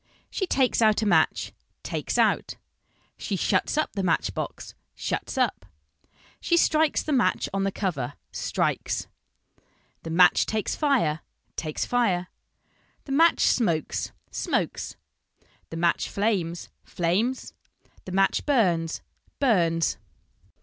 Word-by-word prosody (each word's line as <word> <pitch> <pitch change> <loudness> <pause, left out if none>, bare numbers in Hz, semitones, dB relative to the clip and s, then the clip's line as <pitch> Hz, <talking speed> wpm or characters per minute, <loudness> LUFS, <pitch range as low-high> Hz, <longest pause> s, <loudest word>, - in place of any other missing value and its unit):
She 380 - -2
takes 260 -6 +2
out 220 0 +4
a - - 0
match, 165 -6 +2 0.3
takes - - -3
out. - - +2 0.6
She - - -2
shuts - - +1
up 310 - 0
the 200 - -2
match 175 -3 +1
box, - - -5 0.2
shuts - - -3
up. - - 0 0.7
She 340 - +2
strikes 315 -2 +3
the 305 - -1
match 255 - +2
on 195 0 0
the 195 - 0
cover, 145 - -3 0.2
strikes. - - -1 1.0
The 165 - -7
match 180 +2 +5
takes 215 -1 -1
fire, 250 - +1 0.4
takes 155 -2 -3
fire. 190 -8 +1 0.8
The 275 - -7
match 325 +4 +4
smokes, 170 - +1 0.2
smokes. - - -2 0.7
The 165 - -6
match 170 0 +1
flames, 190 -5 -1
flames. 200 +10 -1 0.5
The 185 - -7
match 195 +1 +2
burns, 175 - +1 0.4
burns. 170 - +2
195 Hz, 120 wpm, -26 LUFS, 170-250 Hz, 1.0 s, match